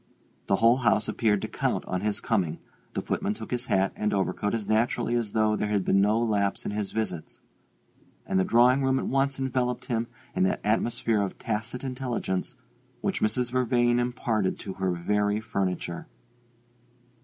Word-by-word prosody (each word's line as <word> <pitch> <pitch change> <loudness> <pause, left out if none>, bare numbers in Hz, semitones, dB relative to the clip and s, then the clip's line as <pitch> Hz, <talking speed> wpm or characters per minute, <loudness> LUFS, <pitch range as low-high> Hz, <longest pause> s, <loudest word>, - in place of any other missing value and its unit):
The 95 - +3
whole 115 +4 +5
house 110 -4 +2
appeared 105 -3 +1
to - - -1
count - - -1
on 90 -1 -2
his 105 0 -1
coming; 90 -8 0 0.4
the - - -1
footman 105 - -1
took 110 - -9
his 125 0 -2
hat 95 0 +2
and 105 -1 0
overcoat 100 +2 0
as 110 -3 -4
naturally 115 +2 +1
as 115 -4 -1
though 110 -1 +3
there 105 - -1
had 100 -3 +1
been 100 - +4
no 105 +2 +3
lapse 105 -4 0
in - - -2
his 105 -1 -3
visits; 110 -7 -4 0.9
and 95 - +1
the - - +4
drawing 125 +6 +5
room 135 0 +2
at - - -1
once 135 0 +1
enveloped 125 -2 -1
him 115 -1 -1 0.3
in - - 0
that 95 - +2
atmosphere 110 0 +1
of 100 - -3
tacit 110 +4 -3
intelligence 125 -8 -3 0.5
which - - -1
Mrs. 120 +3 +1
Vervain 120 -1 +2
imparted 120 -5 0
to 95 - -6
her 95 -1 -1
very 105 +4 +1
furniture. 95 -5 -3
110 Hz, 175 wpm, -27 LUFS, 100-120 Hz, 0.9 s, whole